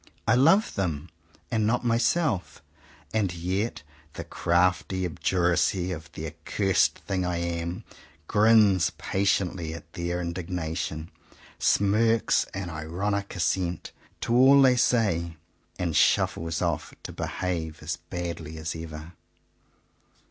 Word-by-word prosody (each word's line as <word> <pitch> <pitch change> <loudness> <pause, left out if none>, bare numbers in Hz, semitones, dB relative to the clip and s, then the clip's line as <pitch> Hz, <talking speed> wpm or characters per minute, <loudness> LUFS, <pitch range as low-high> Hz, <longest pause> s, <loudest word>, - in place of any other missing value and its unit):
I 115 - +5
love 165 - +4
them, 85 -4 -2 0.4
and 110 -3 +1
not 125 +2 0
myself. 120 - 0 0.5
And 105 -4 +1
yet 95 +2 -2 0.3
the - - -6
crafty 90 +2 +1
obduracy 90 +1 +1
of 80 -4 -7
the - - -6
accursed 95 -3 +1
thing 95 -2 -1
I 90 -1 -1
am, 85 +1 -3 0.4
grins 105 -5 +5
patiently 95 -4 0
at - - -12
their 85 0 -2
indignation, 85 -2 -4 0.5
smirks 110 +3 +3
an 95 -2 -6
ironic 95 +7 -3
assent 90 -1 -1 0.3
to 115 - -1
all 135 +3 +7
they 130 -2 +6
say, 85 -10 +1 0.4
and 85 -4 -2
shuffles 80 +1 +2
off - - -2
to - - -6
behave 85 -3 -4
as 75 -1 -3
badly 85 -2 -6
as 80 +1 -4
ever. 80 0 -8
90 Hz, 115 wpm, -26 LUFS, 85-105 Hz, 0.5 s, all